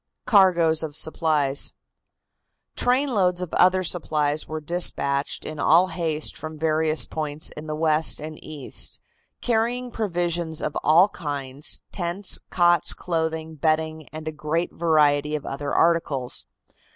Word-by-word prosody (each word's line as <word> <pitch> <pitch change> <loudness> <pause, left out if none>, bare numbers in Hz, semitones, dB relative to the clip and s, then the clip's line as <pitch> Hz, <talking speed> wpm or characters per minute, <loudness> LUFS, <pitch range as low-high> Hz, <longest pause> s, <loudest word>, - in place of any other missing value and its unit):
CARGOES 175 -6 +4
OF 155 -2 -5
SUPPLIES. 155 -4 +2 1.0
Trainloads 245 -9 +1
of 180 -3 -5
other 185 +1 +4
supplies 155 -3 -1
were 155 0 -4
dispatched 150 -4 -1
in 155 -1 -6
all 175 +5 +4
haste 160 -4 0
from 155 0 -7
various 155 0 +2
points 155 0 -3
in 155 +1 -9
the 155 - -3
West 155 0 +2
and 155 0 -8
East, 150 -4 -5 0.4
carrying 245 +1 0
provisions 175 -6 -2
of 150 - -3
all 170 +6 +5
kinds, 145 -6 -4
tents, 185 +1 0
cots, 175 -1 +3
clothing, 160 -2 -3
bedding 155 0 -1
and 155 +1 -8
a - - -1
great 155 +3 -2
variety 150 -2 +2
of 150 - -5
other 140 +1 -4
articles. 155 -7 0
160 Hz, 125 wpm, -24 LUFS, 150-175 Hz, 1.0 s, all